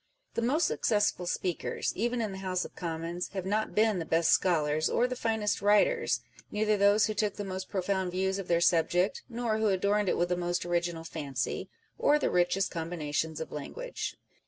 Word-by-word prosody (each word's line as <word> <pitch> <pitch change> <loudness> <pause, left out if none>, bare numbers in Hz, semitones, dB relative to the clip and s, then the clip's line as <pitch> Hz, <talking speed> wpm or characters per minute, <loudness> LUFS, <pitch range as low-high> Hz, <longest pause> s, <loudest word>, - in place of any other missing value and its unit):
The - - -1
most 290 +8 +2
successful 205 -9 +1
speakers, 180 -1 -2
even 240 +2 0
in 215 - -2
the 190 - -7
House 185 -1 -1
of - - -11
Commons, 170 +1 -4
have 190 -2 -3
not 215 +3 -1
been 215 -3 +3
the - - -2
best 165 +1 +2
scholars 155 -3 +2
or 245 - +2
the 250 0 -2
finest 220 -3 0
writers 210 - +3 0.2
â€" - - -19
neither 210 0 +1
those 205 +1 +4
who 215 - -1
took 210 -1 0
the 205 - -4
most 190 -1 -5
profoimd 190 -1 -1
views 190 +2 -1
of 190 - -6
their 170 -1 +2
subject, 175 +3 +2
nor 230 -2 -1
who 220 - +2
adorned 200 +1 +2
it - - +1
with 175 0 +1
the 180 - +2
most 175 0 -1
original 175 -1 -1
fancy, 140 -6 -3 0.3
or 295 - +4
the - - 0
richest 180 +2 +2
combinations 160 -2 -2
of 160 - -6
language. - - -5
190 Hz, 195 wpm, -30 LUFS, 175-215 Hz, 0.3 s, those